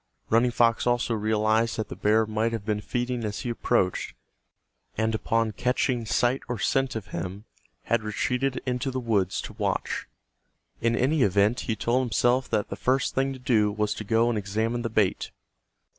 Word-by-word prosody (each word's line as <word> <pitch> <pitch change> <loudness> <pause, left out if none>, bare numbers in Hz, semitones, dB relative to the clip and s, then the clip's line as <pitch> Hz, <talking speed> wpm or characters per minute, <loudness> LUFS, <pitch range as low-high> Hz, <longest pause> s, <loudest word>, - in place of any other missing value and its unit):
Running 115 +2 +4
Fox 115 0 +2
also 120 -1 +1
realized 110 +1 +1
that 110 - -3
the - - -6
bear 110 +1 +3
might 110 +2 -1
have 110 -3 -4
been 105 -1 -1
feeding 120 +2 -2
as 105 -1 -3
he 120 - -2
approached, 115 -5 0 0.8
and 110 0 +1
upon 115 0 0
catching 125 +1 0
sight 125 +5 +1
or 120 - -2
scent 135 +5 0
of 105 -2 -5
him 95 +4 -5 0.4
had 115 -1 +1
retreated 125 +5 -1
into 125 +1 -1
the 130 0 -2
woods 105 -6 0
to - - -8
watch. - - -2 0.7
In 115 0 +2
any 140 +5 +2
event 100 +3 +3
he 110 - +1
told 120 +4 +1
himself 125 +1 +1
that 105 - 0
the - - -4
first 130 +6 +1
thing 135 +1 +1
to - - -8
do 115 -5 +2
was 105 0 -1
to - - -6
go 115 +2 +2
and 115 -3 0
examine 110 +4 -1
the 115 - -2
bait. 105 -4 +1
115 Hz, 180 wpm, -26 LUFS, 105-125 Hz, 0.8 s, Running